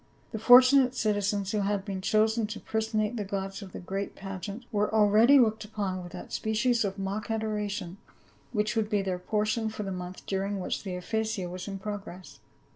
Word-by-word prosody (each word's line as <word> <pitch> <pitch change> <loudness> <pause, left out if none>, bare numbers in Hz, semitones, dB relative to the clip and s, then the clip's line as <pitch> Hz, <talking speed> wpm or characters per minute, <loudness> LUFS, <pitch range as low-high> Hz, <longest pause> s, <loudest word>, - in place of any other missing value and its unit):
The 220 - -4
fortunate 255 +2 +7
citizens 205 -3 0
who 215 - 0
had 200 -1 -1
been 195 -3 -4
chosen 220 +2 +2
to 215 - -6
personate 220 +1 -1
the 210 - -1
gods 195 0 -4
in 195 - -8
the - - -8
great 195 +3 -4
pageant, 195 +4 -7
were 210 -1 +1
already 220 +5 +6
looked 220 -4 +3
upon 200 -3 -3
with 175 -1 -9
that - - -8
species 225 +2 +1
of 195 -1 -3
mock 195 +3 -3
adoration 210 -4 -2 0.5
which 215 -1 0
would 220 -2 0
be 205 -2 +1
their 185 -2 -2
portion 215 +3 0
for 215 -1 -5
the 195 - -4
month 180 0 -7
during 195 +1 -2
which 180 - -3
the 190 -3 -5
Ephesia 220 +1 -2
was 180 +2 -7
in 195 -1 -4
progress. 195 -2 -7
210 Hz, 190 wpm, -28 LUFS, 195-220 Hz, 0.5 s, fortunate